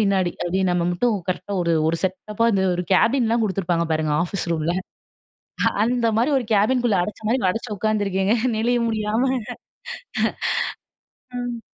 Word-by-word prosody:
பின்னாடி 195 -4 +2
அப்படின்னு 185 +1 0
நம்ம 175 -1 +1
மட்டும் 220 +6 +1
கரெக்ட்டா 185 +2 -3
ஒரு, 170 -1 +1 0.2
ஒரு 165 - +1
செட்டப்பா 210 +4 -1
இந்த 195 -2 +2
ஒரு 180 - -2
கேபின்லாம் 230 +2 +3
குடுத்துருப்பாங்க 175 -4 0
பாருங்க, 155 -1 0
ஆஃபீஸ் 180 -1 -4
ரூம்ல 165 +1 0 1.1
அந்த 240 0 +1
மாரி 250 +6 +2
ஒரு 240 - -5
கேபின்குள்ள 225 +1 +2
அடச்ச 210 +5 -5
மாரி 255 +1 +2
அடச்சு 225 +4 -5
உட்காந்துருக்கேங்க 205 -1 +1 0.2
நெழிய 240 +2 +2
முடியாம. 215 +1 0 2.3
ம். 235 - -5
205 Hz, 135 wpm, -22 LUFS, 180-230 Hz, 2.3 s, கேபின்லாம்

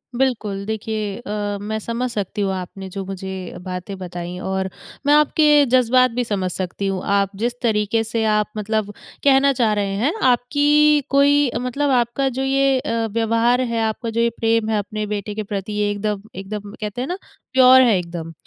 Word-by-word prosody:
बिल्कुल। 220 -6 -1
देखिए 215 -1 -3
अ, 205 -3 -3
मैं 220 +1 -3
समझ 235 +3 -3
सकती 205 -1 -3
हूँ 195 -1 0
आपने 190 +1 -6
जो 195 +1 -5
मुझे 190 -1 -6
बातें 185 +1 -6
बताई 175 -1 -6
और 190 0 -1 0.4
मैं 290 - +5
आपके 300 -1 +5
जज़्बात 255 0 +4
भी 245 +1 -1
समझ 195 -5 -2
सकती 185 +2 -3
हूँ, 190 -1 -2
आप 200 -1 +1
जिस 235 +4 -1
तरीके 220 -1 +1
से 225 0 -2
आप 210 0 0
मतलब 210 0 -2 0.3
कहना 275 0 +5
चाह 230 -4 +2
रहे 200 -1 -1
हैं, 290 - +2 0.2
आपकी 290 +4 +3
कोई 280 +1 +4 0.3
मतलब 280 +3 -1
आपका 245 +2 +1
जो 260 +1 -4
ये 270 0 +2
अ, 230 -2 -1
व्यवहार 230 +2 +2
है, 235 -2 -1
आपका 220 +1 -2
जो 230 +1 0
ये 235 - +3
प्रेम 225 -1 +1
है, 220 - +1
अपने 210 +1 -4
बेटे 205 0 -4
के 215 - -3
प्रति 205 +1 -4
एकदम 205 0 -2
एकदम 200 +1 -6
कहते 210 +3 -4
हैं 260 - -3
ना 360 - -3 0.4
प्योर 260 0 +7
है 230 -6 +4
एकदम। 170 -2 -5
220 Hz, 180 wpm, -21 LUFS, 200-250 Hz, 0.4 s, प्योर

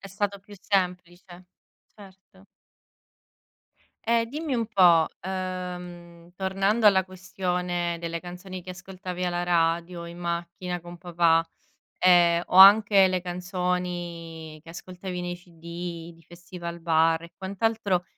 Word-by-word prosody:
È 195 - -10
stato 200 +1 -2
più 205 +1 -14
semplice, 180 -2 -3 0.5
certo. 190 -1 -17 1.6
E 230 0 +2
dimmi 295 +2 -4
un 230 - -1
po', 180 -6 +5
ehm, 180 -2 -6
tornando 195 +4 +1
alla 190 -2 +5
questione 180 -2 -3
delle 170 0 -3
canzoni 180 +2 -8
che 185 +1 -9
ascoltavi 185 0 -6
alla 175 0 -1
radio 170 0 0
in 170 +1 -10
macchina 175 +1 -4
con 175 0 -11
papà, 165 -2 +2 0.5
ehm, 175 -1 +5
o 180 - -1
anche 200 0 +8
le 185 -1 -1
canzoni 175 -3 -4
che 165 - -12
ascoltavi 180 +1 -7
nei 175 0 -4
CD 170 -1 -8
di 165 - -21
Festivalbar 170 -2 -1
e 170 - -13
quant'altro, 200 -1 -1
180 Hz, 120 wpm, -26 LUFS, 170-190 Hz, 1.6 s, anche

